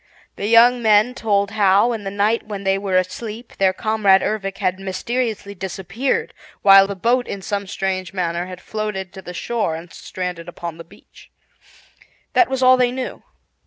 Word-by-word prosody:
The 200 - -3
young 240 +2 +6
men 215 +2 +4
told 205 -4 0
how, 205 +2 +3
in 215 -3 -6
the - - -2
night 205 +3 0
when 200 -2 -6
they 195 0 +1
were 195 -2 0
asleep, 215 +5 -4
their 190 -1 +4
comrade 200 -1 +2
Ervic 195 -2 -2
had 185 -1 -1
mysteriously 205 +2 -3
disappeared, 190 +7 -3 0.3
while 195 -1 +8
the 200 - -4
boat 240 +6 +1
in 195 -1 -6
some 200 0 -3
strange 190 -2 -3
manner 175 -2 -2
had 185 0 -9
floated 210 -4 -4
to 190 - -9
the 180 -1 -9
shore 220 -8 -2
and 165 +1 -10
stranded 180 -2 -6
upon 170 -1 -7
the - - -7
beach. 200 +5 -19 1.0
That 365 - +4
was 265 -1 -1
all 255 0 +7
they 250 -1 +2
knew. 255 0 -5
200 Hz, 175 wpm, -20 LUFS, 185-225 Hz, 1.0 s, while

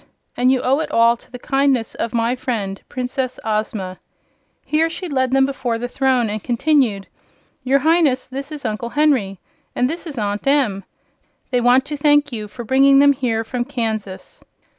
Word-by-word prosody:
And 250 +1 +3
you 260 -1 +1
owe 270 +3 +2
it 310 -2 -3
all 230 -4 +4
to - - -20
the 250 - -7
kindness 270 -3 0
of 230 - -3
my 235 +1 0
friend 220 -7 -4
Princess 255 0 -3
Ozma." 210 -4 -3 0.7
Here 320 +2 +1
she 350 +2 -6
led 260 -4 0
them 270 +1 +3
before 255 -4 -2
the 245 +2 -4
throne 255 -2 +1
and 215 0 -4
continued: 240 -5 +1 0.6
"Your 265 +2 +3
Highness, 310 -2 +2
this 275 +3 -7
is 295 -3 -8
Uncle 220 +1 -3
Henry. 255 -10 +1 0.4
And 250 - +2
this 335 +4 -5
is 290 -4 -7
Aunt 205 +3 -3
Em. 250 -9 +2 0.7
They 250 -1 +2
want 250 +2 +4
to 295 0 -5
thank 290 0 +3
you 215 -3 -5
for 235 +4 -9
bringing 270 +3 +4
them 285 0 +6
here 240 -4 -1
from 240 +2 -3
Kansas." 220 - -5
255 Hz, 180 wpm, -19 LUFS, 225-275 Hz, 0.7 s, them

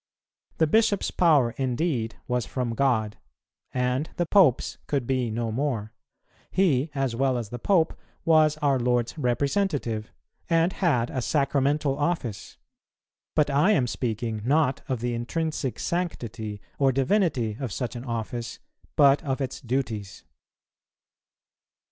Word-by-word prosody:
The 160 - +4
Bishop's 215 +4 +2
power 150 -9 +4
indeed 125 -3 -1
was 125 -2 -1
from 125 -3 -2
God, 110 -4 +1 0.5
and 125 +3 0
the 175 - +1
Pope's 160 - +3
could 140 -4 -1
be 130 -2 0
no 115 +1 -2
more; 115 -4 -2 0.6
he, 165 -6 +2
as 135 -4 0
well 130 0 +1
as 115 -4 -4
the 120 - -6
Pope, 165 - +2 0.3
was 155 -2 +4
our 140 -2 +3
Lord's 120 -1 0
representative, 135 - -1 0.4
and 165 +2 +3
had 135 - +1
a 130 - -2
sacramental 140 +1 +1
office: 145 - -2 0.8
but 150 -2 +3
I 150 +10 +4
am 135 -9 +2
speaking, 115 -2 -3
not 140 +2 +2
of 130 -4 -1
the 120 0 -1
intrinsic 135 +3 -2
sanctity 115 - -3 0.2
or 135 -1 +4
divinity 135 - +1
of 130 -5 -3
such 125 +5 -3
an 120 - -6
office, 115 -1 -4 0.4
but 140 -1 +5
of 135 -3 -2
its 130 -2 -4
duties. 115 -6 -3
130 Hz, 130 wpm, -26 LUFS, 120-150 Hz, 0.8 s, but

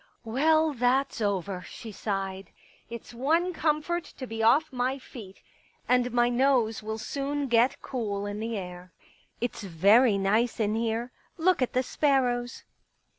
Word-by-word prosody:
" - - -40
Well, 310 +7 +2
that's 255 0 +1
over," 195 -2 -1
she 225 - -9
sighed. 195 -2 -4 0.2
" - - -32
It's 235 +1 -9
one 325 +9 +1
comfort 320 +2 0
to 260 - -5
be 225 -2 -5
off 275 +7 +3
my 255 +2 0
feet. 220 -7 -12 0.4
And 250 0 +2
my 240 0 +3
nose 245 -3 +2
will 220 +1 -4
soon 280 +5 -3
get 235 +1 +2
cool 205 -6 -3
in 205 +1 -4
the 225 0 -3
air.... 180 -1 -8 0.5
It's 240 -1 -3
very 200 +5 +4
nice 215 +5 +1
in 210 -1 +1
here. 230 +2 -1 0.3
Look 360 -1 +2
at 255 - 0
the 255 - +2
sparrows. 250 -4 0
240 Hz, 155 wpm, -27 LUFS, 215-270 Hz, 0.5 s, very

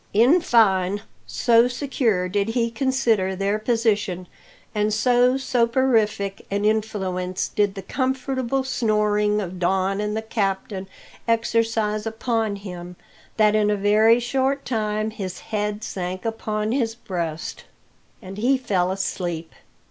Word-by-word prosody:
In 255 - +5
fine, 200 - +3 0.2
so 235 0 +4
secure 245 -7 0
did 200 +2 0
he 230 0 0
consider 230 -7 +1
their 200 +2 0
position, 215 -5 0 0.5
and 210 0 +1
so 245 +3 +3
soporific 235 -6 +1
an 200 +1 -1
influence 190 -4 -1
did 205 -1 0
the 195 - -6
comfortable 260 0 -1
snoring 210 -4 +1
of 185 -2 -5
Don 190 +2 +1
and 210 +1 -2
the 220 - -3
captain 195 -3 -2 0.4
exercise 225 -2 +1
upon 225 -1 -1
him, 180 -3 -8 0.4
that 210 -1 +4
in 210 -1 +3
a 210 - +2
very 215 +3 +4
short 265 +3 0
time 215 -2 -1
his 190 -4 -6
head 210 0 -1
sank 185 -1 -4
upon 215 -1 -2
his 230 -3 0
breast, 170 -8 -5 0.6
and 195 +2 -8
he 260 +5 +3
fell 190 -8 0
asleep. 175 -3 -3
215 Hz, 125 wpm, -23 LUFS, 195-230 Hz, 0.6 s, In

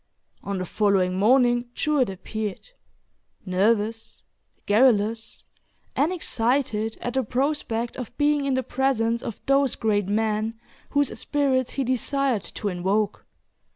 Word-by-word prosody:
On 200 -1 -3
the 185 - -3
following 190 -2 +1
morning, 240 +2 +3
Jewett 295 -7 +1
appeared 210 - -5 0.7
nervous, 210 +4 0 0.4
garrulous, 220 0 +2 0.5
and 300 +5 +2
excited 230 -8 0
at 245 - -3
the 265 - +2
prospect 245 -2 -1
of 250 -4 -7
being 295 -1 +2
in 270 -2 +1
the 260 - 0
presence 240 -3 0
of 230 - -6
those 275 -1 +3
great 205 -3 0
men, 215 +1 -1 0.3
whose 285 -2 +1
spirits 265 -4 0
he 275 - -1
desired 260 -1 0
to 210 - -6
invoke. 195 +3 -1
230 Hz, 120 wpm, -25 LUFS, 210-265 Hz, 0.7 s, morning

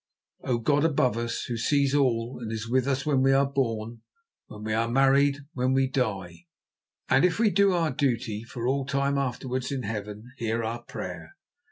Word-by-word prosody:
"O 125 -2 0
God 145 +5 +2
above 140 -7 +2
us, 115 0 -3
Who 120 - -4
sees 140 +3 +2
all 125 -4 +1
and 110 -2 -5
is 110 0 -4
with 130 +2 +1
us 140 +1 0
when 140 -3 +2
we 135 0 +4
are 135 +1 +4
born, 115 -4 -2 0.5
when 105 0 -10
we 110 0 -2
are 115 +1 +1
married, 135 +2 +3
when 130 0 0
we 135 0 +3
die, 95 -10 -3 0.6
and - - +4
if 180 -2 +3
we 220 -2 +3
do 200 +1 +4
our 165 -3 +1
duty 120 -5 -1
for 120 0 -5
all 135 +1 +1
time 140 0 0
afterwards 130 0 -3
in 135 -2 -3
Heaven, 105 +3 -6
hear 115 0 -1
our 115 +2 -3
prayer. 90 -8 -8
125 Hz, 190 wpm, -27 LUFS, 115-140 Hz, 0.6 s, we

